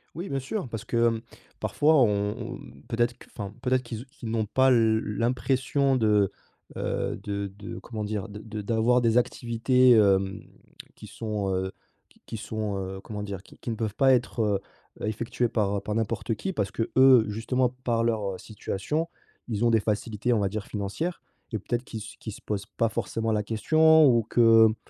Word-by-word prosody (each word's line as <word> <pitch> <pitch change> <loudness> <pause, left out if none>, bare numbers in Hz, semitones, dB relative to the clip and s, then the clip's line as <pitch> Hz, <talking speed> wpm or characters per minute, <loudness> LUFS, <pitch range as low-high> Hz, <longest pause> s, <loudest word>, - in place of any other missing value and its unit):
Oui, 175 +5 -5
bien 135 - -1
sûr, 140 - -4
parce 115 -2 -6
que, - - -4
hem, 115 -1 0 0.4
parfois 155 +2 +3
on 105 -3 +2 0.3
on - - -18 0.3
peut-être 120 +1 0
q - - -16
enfin, 100 -3 -4
mmh, 110 - -17
peut-être 130 +1 +1
qu'ils 115 -2 -6
ou - - -20
qu'ils 125 -5 -8
n'ont 110 -1 0
pas 130 +5 +3
l 110 -3 +4 0.2
l'impression 130 +3 +1
de, 105 -4 +3 0.5
heu, - - -2
de 100 -1 -3
de 105 - -7
comment 110 -3 -5
dire? 105 -2 -3
De 105 0 -8
de 110 0 -6
d'avoir 115 +3 +2
des 115 0 +3
activités, 125 +1 +3
hem, 100 -4 +4 0.5
qui - - -11
sont, 105 -3 -3
heu, 95 0 -2 0.3
qui - - -27
qui 115 - -6
sont, 105 -2 -3
heu, 95 0 -5
comment 105 -1 -6
dire, 100 -2 -6
qui - - -18
qui - - -7
ne 115 - -1
peuvent 110 -2 -2
pas 135 -1 +5
être, 125 -1 0
heu 105 -3 +1 0.4
heu, - - -1
effectuées 115 +2 -1
par 100 -3 0
par 105 +1 -3
n'importe 115 0 -1
qui, 190 - -4
parce 100 - -1
qu'eux, 130 0 +5
justement 115 +5 0 0.2
par 115 -1 +1
leur, 105 -4 0
heu, - - -8
situation, 115 - -3 0.4
ils 115 0 0
ont - - +5
des 115 -2 +3
facilités 110 +2 -1
on 115 - +3
va 100 - +1
dire 100 +1 -4
financières, 105 - -3 0.3
et 110 - -2
peut-être 120 +5 -2
qu'ils 115 -3 -7
s 110 0 -9
qu'ils 110 - -5
se - - -10
posent 100 -1 -3
pas 115 - +3
forcément 115 0 -2
la 105 -1 0
question 155 +9 +5
ou 120 -3 +4
que 115 0 +6
mmh, 110 - -3
115 Hz, 200 wpm, -27 LUFS, 105-125 Hz, 0.5 s, que